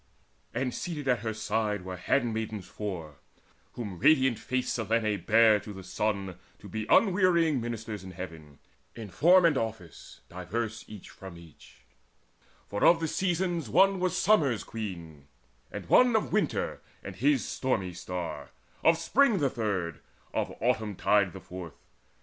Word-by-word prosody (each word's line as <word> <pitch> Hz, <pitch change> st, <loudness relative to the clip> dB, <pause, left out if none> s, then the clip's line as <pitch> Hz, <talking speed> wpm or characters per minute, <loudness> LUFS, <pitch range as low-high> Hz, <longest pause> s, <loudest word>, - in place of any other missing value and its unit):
And 125 Hz, -2 st, -2 dB
seated 155 Hz, -6 st, -5 dB
at 125 Hz, -2 st, +2 dB
her 110 Hz, -, -3 dB
side 110 Hz, -2 st, -2 dB
were 95 Hz, 0 st, -5 dB
handmaids 110 Hz, 0 st, -1 dB
four 85 Hz, -8 st, -6 dB, 0.6 s
Whom 100 Hz, -7 st, -6 dB
radiant 130 Hz, -, +4 dB
faced 130 Hz, +1 st, -2 dB
Selene 110 Hz, -3 st, 0 dB
bare 110 Hz, -1 st, +5 dB
to 105 Hz, -, -9 dB
the 95 Hz, -1 st, -9 dB
Sun 95 Hz, -1 st, -2 dB, 0.2 s
To 105 Hz, -, -13 dB
be 110 Hz, +3 st, -5 dB
unwearying 180 Hz, -, +4 dB
ministers 110 Hz, -3 st, -5 dB
in 95 Hz, -, -9 dB
Heaven, 80 Hz, -5 st, -9 dB, 0.4 s
In 110 Hz, -3 st, -8 dB
form 175 Hz, -, +5 dB
and 150 Hz, -5 st, +3 dB
office 105 Hz, -7 st, -7 dB
diverse 110 Hz, +6 st, -4 dB
each 105 Hz, -3 st, -11 dB
from 95 Hz, -3 st, -11 dB
each; 85 Hz, -3 st, -17 dB, 0.9 s
For 100 Hz, -, -3 dB
of 170 Hz, 0 st, +6 dB
these 160 Hz, -2 st, -2 dB
Seasons 175 Hz, -, -1 dB
one 190 Hz, -, +4 dB
was 185 Hz, -1 st, 0 dB
summer's 150 Hz, -, +3 dB
queen, 85 Hz, -10 st, -7 dB, 0.4 s
And -, -, -7 dB
one 250 Hz, -2 st, +5 dB
of 220 Hz, -, 0 dB
winter -, -, -1 dB, 0.2 s
and -, -, -7 dB
his 290 Hz, -2 st, +2 dB
stormy 100 Hz, -9 st, -2 dB
star, 90 Hz, 0 st, -6 dB, 0.3 s
Of 165 Hz, 0 st, +5 dB
spring 225 Hz, +7 st, +3 dB
the 140 Hz, -6 st, +1 dB
third, 95 Hz, -8 st, -2 dB, 0.3 s
of -, -, -1 dB
autumn 110 Hz, -4 st, 0 dB
tide 100 Hz, 0 st, +2 dB
the 95 Hz, -, -9 dB
fourth. 90 Hz, -4 st, -9 dB
110 Hz, 150 wpm, -28 LUFS, 95-145 Hz, 0.9 s, of